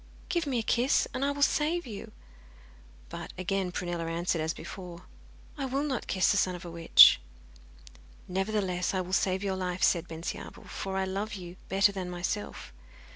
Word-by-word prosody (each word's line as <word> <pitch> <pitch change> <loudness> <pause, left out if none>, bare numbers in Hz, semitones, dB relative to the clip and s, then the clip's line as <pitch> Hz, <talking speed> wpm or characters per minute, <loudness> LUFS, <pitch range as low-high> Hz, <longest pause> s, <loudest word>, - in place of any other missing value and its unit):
Give 340 -3 0
me 260 -3 0
a 230 - 0
kiss, 245 +4 +2
and 260 0 -2
I 280 - +2
will 285 0 0
save 315 +4 +2
you.' 215 -5 -8 1.0
But - - -7
again 185 0 -1
Prunella 175 -2 -3
answered 170 0 -1
as 160 0 0
before, 175 -1 -9 0.6
'I 275 - -1
will 270 +2 -1
not 270 -5 -2
kiss 185 - +3
the 205 - +2
son 185 -2 +2
of 175 - -9
a 170 - -7
witch.' 165 - +8 1.1
'Nevertheless, 190 -1 -1
I 185 - +1
will 185 +1 -7
save 190 0 +1
your 195 -1 -1
life,' 185 -1 -3
said 175 -1 +3
Bensiabel, 165 +1 -6
'for 190 0 -5
I 190 - +1
love 200 +3 -3
you 180 -2 -8
better 195 +1 +4
than 190 -2 -5
myself. 180 - -4
190 Hz, 180 wpm, -29 LUFS, 180-215 Hz, 1.1 s, witch